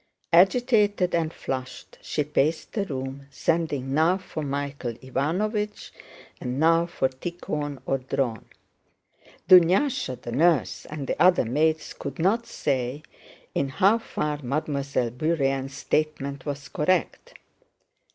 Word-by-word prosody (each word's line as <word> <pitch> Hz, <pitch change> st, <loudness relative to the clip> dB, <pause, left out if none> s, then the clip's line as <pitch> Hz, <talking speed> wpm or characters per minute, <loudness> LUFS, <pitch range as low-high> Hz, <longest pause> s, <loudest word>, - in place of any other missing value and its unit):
Agitated 205 Hz, 0 st, +4 dB
and 165 Hz, -2 st, +1 dB
flushed 130 Hz, -5 st, -6 dB
she 150 Hz, -, -1 dB
paced 150 Hz, +2 st, 0 dB
the 205 Hz, -3 st, -1 dB
room, 135 Hz, -2 st, -5 dB
sending 145 Hz, -2 st, -1 dB
now 160 Hz, +5 st, +3 dB
for 185 Hz, -4 st, -6 dB
Michael 140 Hz, -3 st, -3 dB
Ivánovich 195 Hz, -, -2 dB, 0.5 s
and 125 Hz, +2 st, -3 dB
now 165 Hz, +2 st, +4 dB
for 170 Hz, -6 st, 0 dB
Tíkhon 145 Hz, 0 st, -5 dB
or 135 Hz, -, 0 dB
Dron. 125 Hz, -3 st, -2 dB, 1.0 s
Dunyásha, 180 Hz, -, +4 dB
the 120 Hz, -, -7 dB
nurse, 160 Hz, +4 st, +2 dB
and 150 Hz, -2 st, -5 dB
the -, -, -2 dB
other 180 Hz, -7 st, +5 dB
maids 155 Hz, +6 st, 0 dB
could 140 Hz, -1 st, -7 dB
not 210 Hz, +8 st, +1 dB
say 135 Hz, +1 st, -2 dB, 0.5 s
in 140 Hz, -, 0 dB
how 195 Hz, -, +3 dB
far 150 Hz, -8 st, -3 dB
Mademoiselle 140 Hz, -2 st, -1 dB
Bourienne's 135 Hz, -1 st, -1 dB
statement 140 Hz, -1 st, -2 dB
was 140 Hz, 0 st, -4 dB
correct. 175 Hz, +3 st, -1 dB
150 Hz, 120 wpm, -25 LUFS, 135-170 Hz, 1.0 s, other